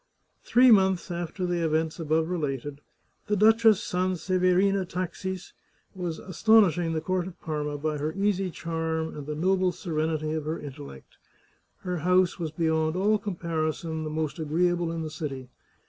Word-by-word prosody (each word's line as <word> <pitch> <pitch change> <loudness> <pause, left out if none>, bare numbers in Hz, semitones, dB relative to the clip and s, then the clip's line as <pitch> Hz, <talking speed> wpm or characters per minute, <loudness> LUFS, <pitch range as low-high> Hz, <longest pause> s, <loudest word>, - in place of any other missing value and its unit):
Three 250 +1 +5
months 190 -4 +3
after 175 +2 -3
the 175 -1 -1
events 160 +1 0
above 160 0 +1
related, 145 -4 -3 0.5
the 210 - +1
Duchess 220 0 +5
Sanseverina 185 +1 +1
Taxis 185 +1 -5 0.4
was 175 -4 -4
astonishing 185 -3 +3
the 160 - -1
court 185 0 -1
of 185 - -11
Parma 150 -2 -3
by 150 0 -2
her 150 +2 -1
easy 195 -1 0
charm 160 -1 -3
and 145 -1 -8
the 150 - -3
noble 185 +3 +2
serenity 155 -2 -2
of 155 -2 -3
her 160 +2 -3
intellect. 140 - -10 0.6
Her 180 -1 -3
house 180 +2 +2
was 165 -2 -2
beyond 160 0 0
all 205 +3 +2
comparison 165 -4 -3
the 155 - -4
most 155 +1 -3
agreeable 170 +2 +1
in 165 -1 -3
the 155 - -5
city. 135 -5 -6
170 Hz, 150 wpm, -27 LUFS, 155-185 Hz, 0.6 s, Three